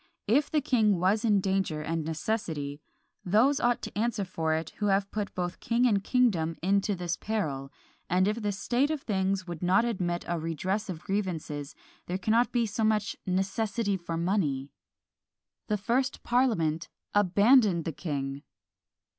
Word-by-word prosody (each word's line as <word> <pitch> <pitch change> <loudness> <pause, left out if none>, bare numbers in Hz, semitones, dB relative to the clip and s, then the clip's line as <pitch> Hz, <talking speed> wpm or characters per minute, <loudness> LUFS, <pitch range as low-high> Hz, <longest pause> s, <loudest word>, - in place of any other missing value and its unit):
If 275 +8 +2
the 305 - +1
king 220 - +2
was 200 +5 +2
in 210 -4 +3
danger 190 -5 0
and 165 0 -2
necessity, 155 -4 -3 0.4
those 235 +10 +3
ought 240 -2 +1
to - - -6
answer 210 -2 0
for 160 -3 -1
it 160 +1 -3
who 205 - 0
have 195 0 +1
put 210 -2 -4
both 180 -1 -3
king 240 +1 +1
and 205 -5 +2
kingdom 190 -11 +2
into 200 +2 +2
this 175 -1 -2
peril: 145 -11 -3 0.4
and 185 +2 +3
if 215 +3 -1
the 205 -1 0
state 245 +8 0
of 310 -3 -2
things 190 -2 0
would 175 -3 -7
not 185 +5 +3
admit 180 -7 -2
a 170 -1 -1
redress 185 +6 -2
of 170 -3 -6
grievances, 170 -8 -3 0.3
there 180 - -1
cannot 225 +5 +2
be 240 -2 +2
so 220 +1 -2
much 215 -1 +1
necessity 200 +3 0
for 170 -2 -4
money." 165 -7 0 1.0
The 210 - +1
first 245 +6 -1
parliament 180 -11 +1 0.2
abandoned 205 -1 +4
the 165 - -1
king! 140 -3 -4
195 Hz, 160 wpm, -28 LUFS, 170-220 Hz, 1.0 s, abandoned